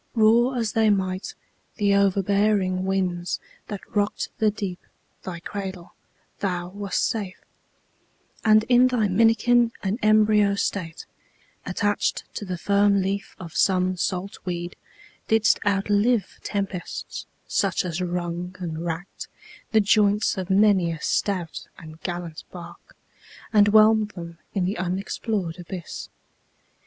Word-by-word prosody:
Roar 235 +3 +4
as 225 -3 0
they 220 -1 +3
might, 190 -2 -1 0.4
the 205 -3 +2
overbearing 200 -1 +2
winds 180 -2 -1 0.3
That 205 -2 -7
rock'd 205 0 0
the 220 -2 +4
deep, 200 -4 -4 0.4
thy 175 -3 -6
cradle, 190 -1 -6 0.5
thou 180 -3 -2
wast 200 0 -1
safe 200 -5 -4 1.1
And 215 -1 +5
in 250 +2 +5
thy 240 -4 +1
minikin 230 +4 +4
and 200 +4 -1
embryo 215 -1 +4
state, 175 -4 -3 0.6
Attach'd 205 -1 0
to 205 - -5
the 180 -2 -4
firm 200 +1 +3
leaf 195 +1 -3
of 170 -3 -9
some 185 -1 +2
salt 185 +2 -3
weed, 175 -1 -4 0.5
Didst 220 -1 +3
outlive 205 +2 +1
tempests, 195 -3 -4 0.2
such - - 0
as 175 0 -3
wrung 175 0 -3
and 165 -3 -5
rack'd 170 +2 -5 0.4
The 220 -1 +5
joints 210 0 +3
of 190 -1 -5
many 190 -3 +4
a 165 - -5
stout 180 -1 -2
and 160 -1 -12
gallant 175 -3 -5
bark, 175 -1 -12 0.6
And 205 -1 +6
whelm'd 215 0 +5
them 170 -2 -8 0.2
in 190 -2 +1
the 190 +1 -2
unexplor'd 185 0 -2
abyss. 175 0 -7
195 Hz, 125 wpm, -24 LUFS, 180-210 Hz, 1.1 s, And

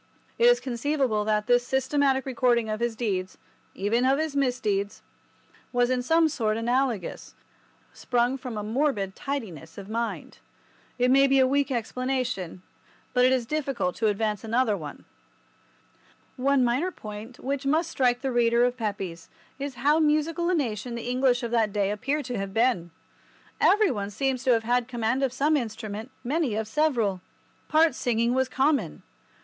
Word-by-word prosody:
It 470 - +4
is 485 0 +5
conceivable 255 - -1
that 210 -1 +1
this 245 +1 +4
systematic 265 0 +1
recording 240 -3 +1
of 215 - -3
his 235 -1 -1
deeds—even 205 +1 -3
of 265 +1 +3
his 310 -1 -2
misdeeds—was 245 0 -3
in 255 -1 +1
some 325 +5 +3
sort 225 -8 -1
analogous, 240 -4 -1 0.6
sprung 245 +1 0
from 250 -4 -6
a 210 - -3
morbid 215 -4 -1
tidiness 195 - -6
of 200 0 -9
mind. 230 +1 -4 0.6
It 250 0 +3
may 275 +1 +6
be 270 0 +3
a 260 - +5
weak 280 +2 +1
explanation, 250 -7 -3 0.5
but 250 0 +4
it 255 - +4
is 255 -2 +1
difficult 275 -9 -2
to 225 - +1
advance 210 0 -1
another 225 -1 +1
one. 150 -6 -8 1.3
One 270 0 +2
minor 250 +9 +1
point 215 - -9
which 275 +1 -3
must 320 +3 +1
strike 245 -2 +1
the 270 -1 -1
reader 235 0 +3
of 245 0 -1
Pepys 190 -7 -4 0.3
is 275 -2 -4
how 295 +4 +2
musical 315 +3 +1
a 365 - +2
nation 240 -4 -2
the 235 +1 -4
English 255 0 +2
of 235 - -3
that 225 -3 +2
day 200 -1 0
appear 275 +8 -1
to 245 -4 -4
have 195 0 -5
been. 225 -8 +2 0.7
Every 420 -2 +4
one 205 -4 -3
seems 260 +4 -1
to 255 - +5
have 225 -1 +1
had 240 +1 +1
command 240 +1 -1
of 270 -2 +1
some 290 +4 +1
instrument, 220 -3 -4
many 270 -3 0
of 220 0 -2
several. 230 -9 +1 0.5
Part 315 -1 +4
singing 235 -1 0
was 260 0 +1
common. 265 - 0
245 Hz, 160 wpm, -26 LUFS, 220-275 Hz, 1.3 s, may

